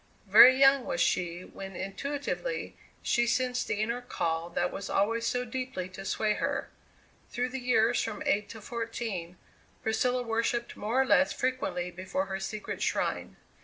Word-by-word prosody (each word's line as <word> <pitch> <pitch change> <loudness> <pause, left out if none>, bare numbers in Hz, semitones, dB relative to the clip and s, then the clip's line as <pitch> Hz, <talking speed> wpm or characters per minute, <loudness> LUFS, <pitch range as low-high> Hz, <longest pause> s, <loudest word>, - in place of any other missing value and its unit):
Very 235 +6 +9
young 270 -1 +6
was 175 - -2
she 175 -1 +1
when 195 0 -9
intuitively 280 - -4 0.3
she 240 -1 +2
sensed 250 +1 0
the 210 - -1
inner 235 +3 -2
call 165 -7 -2
that 175 +1 -1
was 195 - -6
always 230 +4 +1
so 250 0 0
deeply 250 -6 -4
to 190 +1 -9
sway 215 +2 +1
her. - - -2 0.6
Through 250 +1 -1
the 265 +1 -4
years 245 -2 +3
from 300 - -4
eight 210 -7 +1
to 225 - -9
fourteen 205 -6 -4 0.5
Priscilla 250 +3 +1
worshipped 230 +1 -1
more 225 +5 -1
or - - -4
less 280 +2 +4
frequently 255 -9 -2
before 185 +1 -3
her 190 0 -4
secret 205 +2 -5
shrine. - - -1
230 Hz, 160 wpm, -29 LUFS, 190-250 Hz, 0.6 s, Very